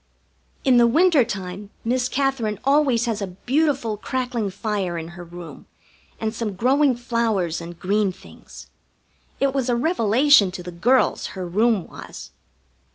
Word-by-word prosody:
In 260 -2 +4
the 240 0 +6
winter 315 +2 +4
time 200 -3 -6 0.2
Miss 250 +1 0
Katherine 260 -7 -1
always 275 -4 +3
has 225 -3 -2
a 200 - -2 0.2
beautiful 270 -5 +1
crackling 245 -2 -2
fire 195 -3 -3
in 165 0 -6
her 175 +1 -10
room, 175 0 -11 0.5
and 220 -1 -2
some 220 -3 -4
growing 265 +5 +3
flowers 230 -9 -1
and 170 0 -9
green 200 +1 +1
things. 185 - -14 0.7
It 275 -1 +1
was 265 -2 -1
a 240 - +2
revelation 245 - +4
to 180 - -7
the 180 - -7
girls, 240 +10 +2
her 185 - -3
room 210 +2 +1
was. - - -10
230 Hz, 150 wpm, -22 LUFS, 190-260 Hz, 0.7 s, the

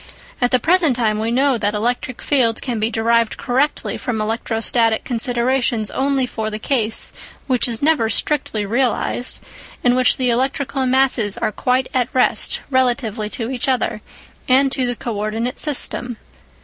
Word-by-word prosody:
At 245 - +3
the 255 - +4
present 320 0 +3
time 215 -3 0
we 220 +1 -1
know 260 +1 +2
that 205 0 0
electric 245 +3 -2
fields 240 -6 +2
can 240 -4 -3
be 215 +1 +1
derived 230 0 +1
correctly 265 +5 -1
from 235 -3 -3
electrostatic 225 +1 0
considerations 240 -1 0
only 270 -1 +1
for 220 -3 -4
the 215 - -4
case, 225 -2 +1 0.3
which 255 -3 +2
is 235 +2 -3
never 295 -7 +3
strictly 220 -3 0
realised, 245 +2 -1 0.4
in 245 - +4
which 255 0 +3
the 250 -2 +1
electrical 265 +1 -1
masses 250 -5 +2
are - - -1
quite 255 +4 0
at 255 -1 +1
rest 255 - +2
relatively 240 -5 0
to 230 +2 -4
each 265 +2 -2
other, 240 -4 0 0.5
and 270 +1 +4
to 260 -2 -1
the 245 - -2
co 235 -1 -5
ordinate 220 +4 -3
system. 250 -5 -2
245 Hz, 160 wpm, -19 LUFS, 225-260 Hz, 0.5 s, the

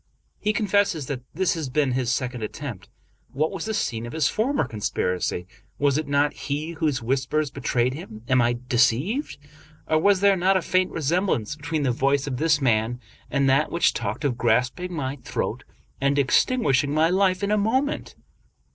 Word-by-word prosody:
He 210 - +1
confesses 200 -7 +1
that 130 -2 -4
this 185 +2 +1
has 160 -6 -4
been 140 0 +1
his 125 -1 0
second 125 -1 -2
attempt. 120 - -6 0.4
What 155 +4 0
was 190 -2 -5
the 220 - -2
scene 115 - -2
of 120 - -8
his 155 -3 +2
former 255 - 0
conspiracy? 90 -5 -2 0.3
Was 140 -1 +2
it 155 0 -1
not 145 +1 +2
he 150 +3 -4
whose 150 -6 -1
whispers 135 +4 0
betrayed 125 -2 0
him? 110 -8 -9
Am 130 -1 +4
I 120 0 +1
deceived? 130 - +1 0.5
or 155 0 +3
was 195 +2 +3
there 200 -1 +5
not 190 +1 +3
a 185 - -2
faint 185 0 +1
resemblance 160 - 0
between 150 0 -3
the 130 - +2
voice 140 +3 +1
of 135 -3 -3
this 155 +1 +2
man 120 -2 +1 0.3
and 140 -1 +1
that 135 +3 +3
which 170 0 +2
talked - - -3
of 125 -3 -1
grasping 125 +10 +1
my 140 -4 -3
throat 125 - -4 0.4
and 140 +1 +2
extinguishing 140 - +2
my 160 +2 +3
life 190 0 +2
in 200 - 0
a - - +4
moment? 260 +8 -1
145 Hz, 180 wpm, -24 LUFS, 125-180 Hz, 0.5 s, there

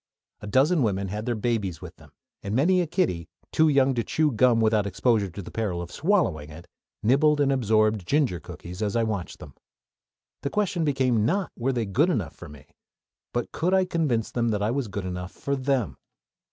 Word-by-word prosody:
A 105 - -9
dozen 140 - +3
women 100 -4 0
had 105 +4 -5
their 120 - 0
babies 105 -6 -1
with - - -10
them, - - -18 0.3
and 100 +2 -3
many 180 +8 +3
a 175 - +2
small - - -11
kiddie, 90 - -1 0.2
too 160 0 +4
young 135 -2 +3
to 120 -2 -1
chew 155 +4 +1
gum 120 0 +3
without 110 -2 +2
exposure 105 -1 +1
to 95 +3 -8
the - - -10
peril 105 -6 -2
of 85 0 -6
swallowing 145 - 0
it, 80 +3 -11 0.4
nibbled 145 +6 +4
and 140 -1 +3
absorbed 110 -6 +2
ginger 140 - +1
cookies 90 +4 -9
as 105 0 -1
I 115 - +2
watched 105 -5 -3
them. - - -12 0.9
The 140 - -2
question 185 -2 0
became 130 -7 +1
not 185 - 0
were 130 +3 -1
they 120 -3 -1
good 130 - +2
enough 105 - -1
for - - -11
me, 75 0 -14 0.7
but 120 -1 -3
could 180 +4 +1
I 190 -1 +3
convince 150 -11 -1
them 120 -1 0
that 105 -2 -1
I 105 - +1
was 135 -1 -1
good 100 -1 -5
enough 90 +1 -5
for 140 - -2
them. 130 -4 -1
115 Hz, 205 wpm, -25 LUFS, 100-140 Hz, 0.9 s, too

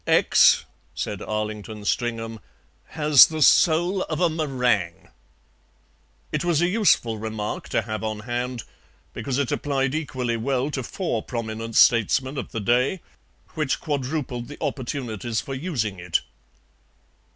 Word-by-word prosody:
"X," - - +5 0.3
said - - -4
Arlington 105 0 -4
Stringham, 115 -1 -2 0.5
"has 150 -3 +6
the 155 -1 0
soul 175 +6 +4
of 155 - -4
a 175 -2 +3
meringue." 125 - -1 1.2
It - - -1
was 170 -3 +2
a 175 - +3
useful 180 - +2
remark 110 -1 -4
to 115 - 0
have 110 -1 -5
on 110 -1 -3
hand, 120 +1 -3 0.5
because 125 +3 -3
it 140 -3 0
applied 135 -2 -1
equally 130 -6 -2
well 130 +4 -1
to 135 - -2
four 130 - -3
prominent 115 -1 -5
statesmen 130 +4 +4
of - - -7
the 115 - -3
day, 125 - +1 0.5
which 155 -4 -1
quadrupled 135 -4 -3
the 145 - -9
opportunities 120 -4 -3
for 135 - -6
using 130 - -3
it. 90 -1 0
125 Hz, 130 wpm, -24 LUFS, 110-150 Hz, 1.2 s, has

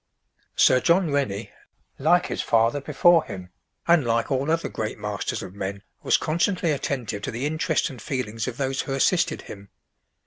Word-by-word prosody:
Sir 130 - +5
John 170 +2 +2
Rennie, 110 -7 -1 0.5
like - - +3
his - - -3
father 115 +5 +2
before 165 +4 +4
him, 90 -1 -8 0.4
and 170 -3 +5
like 115 +1 0
all 135 +2 0
other 165 +1 +1
great 110 -1 -4
masters 105 +1 -3
of 95 -1 -9
men, 100 0 -5 0.2
was - - +3
constantly 170 +1 0
attentive 125 -7 -3
to - - -4
the 120 +5 -3
interests 155 +1 0
and 125 -5 -9
feelings 115 -5 -3
of 125 -1 -5
those 135 -1 -1
who 135 - -4
assisted 170 +6 +1
him. 100 -1 -11
130 Hz, 170 wpm, -24 LUFS, 105-155 Hz, 0.5 s, Sir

